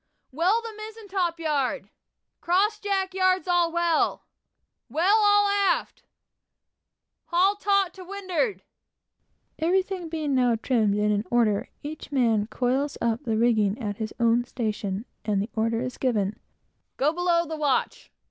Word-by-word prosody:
"Well 365 - +1
the 455 -1 -7
mizen 430 0 -10
top 355 -3 -1
gallant - - -11 0.4
yard!" 200 - -30 0.5
"Cross 405 +5 +2
jack 390 -2 -1
yards 370 0 +2
all 350 -1 +2
well!" 340 -1 +1 0.6
"Well 355 - +3
all 410 -1 +5
aft!" 400 -3 0 1.2
"Haul 370 +3 +3
taut 400 -2 +1
to 375 - -11
windward!" 395 +2 -2 1.0
Everything 365 +1 0
being 310 -3 -2
now 250 -3 +3
trimmed 220 -3 +1
and 210 0 +2
in 205 0 0
order, 225 -4 +1
each 295 0 -7
man 230 -6 +2
coils 265 +5 -1
up 235 0 0
the 225 -2 0
rigging 220 -3 +2
at 205 -4 -4
his 220 -1 -4
own 235 +1 +3
station, 215 -4 -3 0.2
and 205 -2 0
the 205 +4 -3
order 225 +1 0
is 255 0 -5
given 215 -6 0 0.6
"Go 295 +4 +2
below 345 -1 +1
the 320 0 -5
watch!" 295 -4 -1
315 Hz, 145 wpm, -25 LUFS, 230-375 Hz, 1.2 s, all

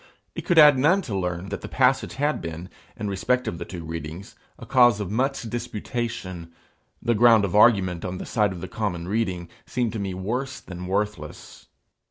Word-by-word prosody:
It - - -6
could 175 - +2
add 150 -4 +8
none 175 +8 +3
to 110 - -4
learn 90 0 -3
that - - -5
the - - -6
passage - - +1
had 145 +2 0
been, 85 +2 -7 0.3
in 105 - -4
respect 115 +6 0
of 85 - -4
the - - -5
two 85 -2 -8
readings, 80 - -7 0.2
a - - -10
cause 120 -5 +5
of 100 -2 -4
much 135 +4 0
disputation: 115 -6 -5 0.5
the 120 - +2
ground 115 -2 +5
of 100 - -3
argument 95 -6 +4
on 90 0 -4
the - - -6
side 105 -4 +1
of 90 -2 -7
the 95 - -5
common 90 -6 -3
reading, 95 -4 -1 0.2
seemed 120 -3 -1
to 110 - -3
me 95 -2 -3
worse 125 +9 -3
than 90 -1 -8
worthless. 95 -5 -4
105 Hz, 195 wpm, -24 LUFS, 90-120 Hz, 0.5 s, add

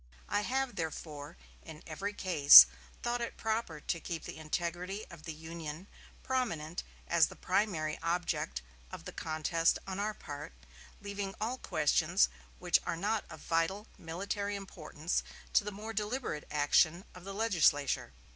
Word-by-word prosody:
I 205 - +1
have, 265 +3 -1
therefore, 155 -1 -5 0.2
in 160 -1 -11
every 195 +6 -4
case, 145 - +10 0.4
thought 240 0 -1
it 235 - -4
proper 220 -8 -2
to 165 - -2
keep 165 -1 -5
the - - -7
integrity 175 +5 -3
of 165 -2 -12
the 165 - -4
Union 160 +2 -7 0.4
prominent 175 -11 -2 0.3
as 170 -1 +4
the - - -11
primary 175 -6 0
object 165 - -1 0.3
of - - -8
the - - -6
contest 165 +1 +1
on 190 0 -4
our 210 +1 -1
part, 145 - -8 0.5
leaving 200 -1 -4
all 235 +4 -2
questions 145 - +2 0.3
which - - +3
are 165 - -2
not 210 +4 -1
of 160 -2 -10
vital 165 +6 0
military 200 +5 -3
importance 170 -4 -3 0.3
to - - +5
the 210 - -4
more 215 +3 -7
deliberate 210 - -3
action 155 +4 +3
of 180 - -12
the 195 +1 -7
legislature.... 175 -10 +2
175 Hz, 145 wpm, -32 LUFS, 155-205 Hz, 0.5 s, case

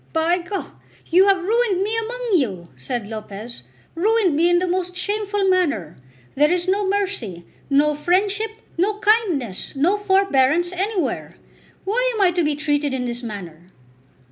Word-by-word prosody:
"By 330 +2 +2
G, 350 - -11 0.6
you 370 +4 +6
have 385 -2 +3
ruined 425 -2 +1
me 430 +2 -1
among 475 +2 -3
you," 195 - 0
said 200 - -4
Lopez; 215 - -7 0.3
"ruined 395 -1 +2
me 335 +3 +3
in 350 - +4
the 360 - +1
most 360 0 -2
shameful 410 +1 -1
manner. 285 - +1 0.4
There 295 +3 +3
is 355 0 0
no 390 +1 +1
mercy, 375 - -2 0.2
no 295 +2 +3
friendship, 390 +8 +1 0.3
no 405 +4 +2
kindness, 370 - +1
no 340 +9 +2
forbearance 350 -5 +2
anywhere! 385 +1 -2 0.5
Why - - +1
am 425 - -1
I 370 -2 +5
to 350 0 0
be 300 -1 +1
treated 290 -2 0
in 250 -1 -2
this 240 0 -3
manner?" 180 -7 -8
355 Hz, 155 wpm, -21 LUFS, 270-400 Hz, 0.6 s, you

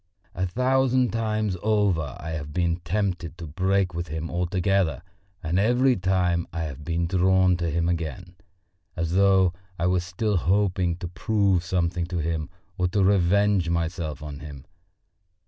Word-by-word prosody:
A 95 +1 -1
thousand 130 +3 +2
times 110 -3 -1
over 100 -10 +1
I 80 +1 -6
have 75 -2 -5
been 85 -1 +1
tempted 90 -2 -2
to 85 - -7
break 95 +4 0
with 85 +1 -4
him 80 +2 -5
altogether, 90 -3 0 0.4
and 85 +3 0
every 125 +5 +3
time 90 -3 +1
I 85 - -4
have 75 -2 -6
been 85 +2 -1
drawn 95 +1 +3
to 85 -1 -1
him 85 +2 0
again, 85 +1 -3 0.6
as 85 -2 -2
though 95 -2 +4 0.2
I 85 - -1
were 90 0 +3
still 95 +4 -1
hoping 90 -1 +1
to 90 0 -6
prove 95 0 +1
something 85 -1 -1
to 90 0 -4
him 80 0 -2 0.3
or 90 - +2
to 100 +2 +1
revenge 100 -1 +3
myself 85 -3 -2
on 75 -1 -7
him. 70 -3 -10
90 Hz, 155 wpm, -25 LUFS, 85-100 Hz, 0.6 s, though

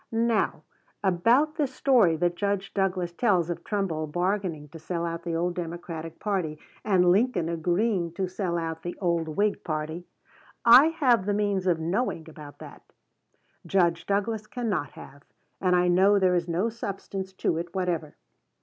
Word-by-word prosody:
Now, 230 -1 0 0.4
about 230 - +3
this 275 -4 -1
story 235 -13 +4
that 175 +2 0
Judge 200 0 -2
Douglas 185 -3 -1
tells 175 -4 +1
of 170 - -6
Trumbull 180 -7 -2
bargaining 175 -2 -2
to 165 - -11
sell 170 +2 -3
out 165 0 -4
the 170 -1 -3
old 175 +2 0
Democratic 170 -2 -6
party, 185 -7 -2 0.3
and 180 -4 +4
Lincoln 195 -4 +2
agreeing 175 +2 0
to 190 +1 -2
sell 180 -2 -2
out 165 -1 -4
the 175 - -6
old 170 -3 0
Whig 205 +7 0
party, 160 +2 -4 0.6
I 245 +6 +9
have 255 - +2
the 205 - +1
means 200 -3 0
of 170 -3 +2
knowing 170 0 -2
about 150 -2 -11
that; - - -12 0.8
Judge 170 -3 +1
Douglas 210 +2 -1
cannot 215 - -3
have; 140 +1 -12 0.4
and 180 -1 +3
I 180 0 +3
know 190 +3 +4
there 185 -2 +3
is 175 -1 0
no 175 +7 0
substance 195 -3 -6
to 165 -3 -1
it 170 +1 -7
whatever. 175 -5 -2
180 Hz, 160 wpm, -26 LUFS, 170-205 Hz, 0.8 s, I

